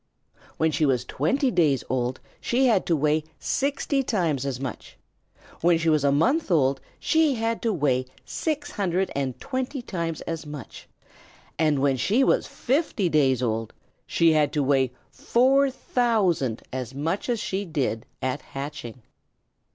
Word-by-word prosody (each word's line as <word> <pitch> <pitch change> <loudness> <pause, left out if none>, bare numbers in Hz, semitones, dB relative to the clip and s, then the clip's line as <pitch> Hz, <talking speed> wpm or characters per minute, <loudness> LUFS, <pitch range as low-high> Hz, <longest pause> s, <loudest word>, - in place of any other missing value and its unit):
When 160 0 +2
she 155 - 0
was 130 -4 +2
twenty 255 - 0
days 150 - +2
old 125 0 -1 0.2
she 255 +3 +1
had 225 -7 +3
to 170 - +3
weigh 150 +1 +1
sixty 280 0 0
times 165 - 0
as 130 -2 -3
much; 130 -4 -7 0.6
when 170 0 +4
she 165 0 +1
was 155 -2 +3
a 140 - +4
month 260 - +2
old 135 -6 +2 0.2
she 315 -4 +3
had 225 0 -1
to 230 - +1
weigh 135 -8 +1 0.2
six 295 -2 -3
hundred 190 - -1
and 135 -3 -2
twenty 260 +2 -3
times 170 -7 -3
as 165 -1 -4
much; 150 -5 -9 0.7
and 155 -2 +3
when 135 -1 +2
she 210 - +2
was - - +2
fifty 255 - 0
days 135 -5 +3
old 115 -1 -2 0.3
she 165 -1 +3
had 150 -2 +3
to 150 - +1
weigh 135 -2 +2 0.2
four 260 - +3
thousand 205 - +1
times - - -22
as 130 0 -4
much 165 - -2
as 235 -2 +1
she 195 0 -2
did 140 - -2 0.2
at 130 0 -1
hatching. 135 -4 -7
160 Hz, 160 wpm, -25 LUFS, 135-230 Hz, 0.7 s, when